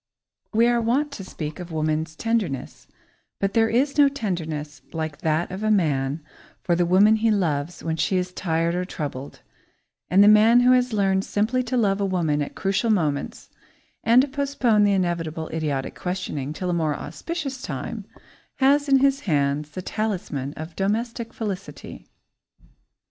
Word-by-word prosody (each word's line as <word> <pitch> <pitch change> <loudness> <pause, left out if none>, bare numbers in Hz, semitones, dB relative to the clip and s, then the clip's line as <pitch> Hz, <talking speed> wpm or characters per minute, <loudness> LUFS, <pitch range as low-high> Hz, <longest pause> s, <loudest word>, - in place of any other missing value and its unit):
We 230 +1 +4
are 240 0 +2
wont 270 +6 +1
to 205 - -7
speak 155 -4 -6
of 175 -1 -8
woman's 155 0 -1
tenderness, 215 - -2 0.5
but 195 0 -1
there 225 -1 +3
is 275 +5 +1
no 285 -1 +7
tenderness 160 - -4
like 160 -3 -4
that 160 +3 0
of 190 +2 -5
a 215 - 0
man 150 -7 +1 0.4
for 175 - +2
the 175 0 +1
woman 205 +5 +5
he 225 +1 +2
loves 170 -6 -1
when 160 0 -2
she 165 +4 +1
is 180 0 -2
tired 165 -2 0
or 180 +1 -1
troubled, 145 -6 -6 0.7
and 195 +3 +6
the - - +6
man 220 +3 +6
who 250 +1 +5
has 250 -1 +3
learned 195 -2 +1
simply 220 +6 0
to 250 +1 -1
love 200 -3 +1
a - - +2
woman 165 -6 0
at 145 - -5
crucial 195 +4 0
moments, 155 -9 -1 0.5
and 240 +3 +6
to - - -1
postpone 265 -6 +1
the 200 - +3
inevitable 170 -4 -2
idiotic 150 -4 -2
questioning 180 -7 -4
till 180 +3 -3
a - - 0
more 160 -3 0
auspicious 285 - -5
time, - - -5 0.5
has 285 +2 +3
in 270 -1 +5
his 275 0 +3
hands 145 0 +1
the 180 +5 -7
talisman 180 -11 -3
of 160 +1 -8
domestic 230 +4 -2
felicity. 200 -4 -7
190 Hz, 165 wpm, -24 LUFS, 160-230 Hz, 0.7 s, no